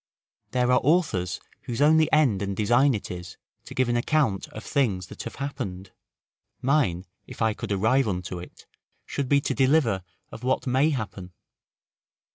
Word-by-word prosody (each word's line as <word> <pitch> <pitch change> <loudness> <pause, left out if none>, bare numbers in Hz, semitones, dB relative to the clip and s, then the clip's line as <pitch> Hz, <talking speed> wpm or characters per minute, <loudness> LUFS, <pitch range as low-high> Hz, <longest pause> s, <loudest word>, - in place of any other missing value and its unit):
There 125 0 +1
are 125 - +4
authors 140 - +1 0.3
whose 120 0 -4
only 155 +2 +5
end 135 -11 +3
and 100 -1 -3
design 120 +5 +4
it 105 - -6
is 90 -1 -8 0.3
to - - -10
give 130 -1 +2
an 120 - +1
account 120 -4 +1
of 110 - -9
things 110 - 0
that - - -8
have - - -7
happened; 95 -9 -5 0.7
mine, 125 - +1 0.2
if - - -11
I 110 -1 +2
could - - -6
arrive 110 +7 +2
unto 90 -2 -3
it, 90 - -12 0.4
should 140 -3 -3
be 140 0 +4
to - - -1
deliver 130 - +2 0.3
of - - -9
what 130 +1 0
may 135 +4 +3
happen. 100 - -5
120 Hz, 165 wpm, -26 LUFS, 95-140 Hz, 0.7 s, only